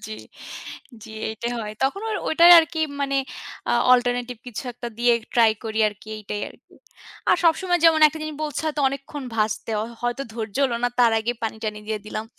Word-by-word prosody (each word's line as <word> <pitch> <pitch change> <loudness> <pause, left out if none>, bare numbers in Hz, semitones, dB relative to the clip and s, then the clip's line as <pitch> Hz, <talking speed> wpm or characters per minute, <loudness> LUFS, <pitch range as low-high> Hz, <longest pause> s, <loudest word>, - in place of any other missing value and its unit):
জি, 220 - -10 0.9
জি, - - -11 0.2
এইটাই 220 +2 -4
হয়। 210 -1 -5
তখন 275 +9 0
ওর, 435 - -1
ওইটাই 335 +2 +6
আরকি 320 0 0 0.2
মানে 275 0 0 0.5
আ - - +2 0.2
অল্টারনেটিভ 245 0 +1
কিছু 245 -1 -6
একটা 240 0 -7
দিয়েই 240 -1 +4 0.2
ট্রাই 230 -2 +6
করি 220 0 -3
আরকি, 210 +1 -13
এইটাই 210 0 -5
আরকি। - - -20 0.5
আর - - +5
সবসময় 350 +2 +3
যেমন 325 -1 +6
একটা 305 +1 -3
জিনিস 310 -1 -5
বলছে 295 -3 -3
হয়তো 300 -1 -1
অনেকক্ষণ 275 +1 -7
ভাজতে 215 0 -1 0.3
হয়তো 240 +3 -1
ধৈর্য 220 -2 -5
হল 245 -3 0
না - - +3
তার 235 -2 +5
আগেই 235 +2 -2
পানি 220 -1 -2
টানি 215 -1 -3
দিয়ে 215 -1 -3
দিলাম। 215 +1 -4
240 Hz, 185 wpm, -23 LUFS, 220-290 Hz, 0.9 s, ওইটাই